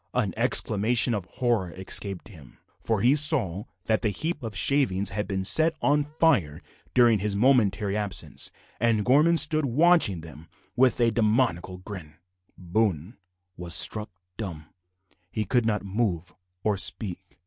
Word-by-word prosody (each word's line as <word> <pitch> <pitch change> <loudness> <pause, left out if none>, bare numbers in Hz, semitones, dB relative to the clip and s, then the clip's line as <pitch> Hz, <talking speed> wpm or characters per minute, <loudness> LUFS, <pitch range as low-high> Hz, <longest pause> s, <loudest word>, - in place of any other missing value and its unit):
An 110 -7 -1
exclamation 115 0 +2
of 100 -5 -4
horror 115 -4 -2
escaped 95 +1 -1
him, 75 - -16 0.2
for 110 -3 -2
he 125 +4 +3
saw 125 - +3 0.2
that 110 -1 0
the 110 - 0
heap 160 - -4
of 110 -4 -7
shavings 100 -3 0
had 105 0 -4
been 95 -1 -3
set 160 +9 +2
on 145 0 +1
fire 145 - 0 0.4
during 120 -4 +4
his 100 0 -2
momentary 105 -4 +1
absence, 105 -3 -4 0.3
and 110 -2 0
Gorman 150 +6 +3
stood 155 +1 +4
watching 135 - +3
them 80 0 -13 0.3
with 130 0 +2
a 120 -1 +2
demoniacal 105 -5 -1
grin. 85 -7 -9 0.4
Boone 95 - -2 0.4
was 85 -1 +1
struck 105 +5 +1 0.3
dumb. 80 -8 -8 0.6
He 110 +3 -4
could 120 +2 0
not 105 -2 -2
move 95 -4 -3 0.3
or 105 -2 0
speak. 95 -2 -1
105 Hz, 145 wpm, -25 LUFS, 95-125 Hz, 0.6 s, during